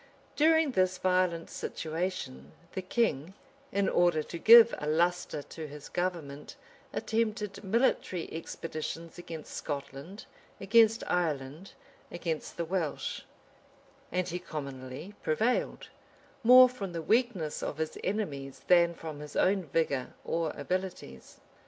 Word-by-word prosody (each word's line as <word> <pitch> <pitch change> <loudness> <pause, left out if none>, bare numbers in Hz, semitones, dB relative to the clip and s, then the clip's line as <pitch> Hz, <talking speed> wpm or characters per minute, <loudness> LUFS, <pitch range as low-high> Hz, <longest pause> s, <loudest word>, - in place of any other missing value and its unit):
During 320 -1 +4
this 185 -4 +2
violent 180 -3 +1
situation, 155 - -4 0.2
the 190 - -4
king, 185 - -1 0.4
in 200 0 +1
order 175 -3 +3
to 170 - -7
give 230 +4 +9
a 150 - -4
lustre 165 -1 0
to 160 +1 -8
his 145 0 -10
government, 165 -6 -4 0.4
attempted 215 -3 -2
military 195 -4 +1
expeditions 165 +1 -6
against 165 -3 -8
Scotland, 145 +6 -6 0.3
against 225 +2 +4
Ireland, 155 0 -2 0.4
against 165 -3 -4
the 170 - -1
Welsh:[*] 165 -3 -3 0.9
and 180 0 0
he 180 0 -3
commonly 140 +1 -7
prevailed, 220 +11 0 0.5
more 255 +2 +9
from 205 -8 -6
the 165 - -3
weakness 220 -8 +1
of 150 - -4
his 160 0 -3
enemies 145 -10 -3
than 170 -1 +5
from 155 -3 -7
his 150 -1 -9
own 190 -1 +2
vigor 140 -4 -1
or 165 -2 -1
abilities. 145 - -5
175 Hz, 120 wpm, -30 LUFS, 155-195 Hz, 0.9 s, give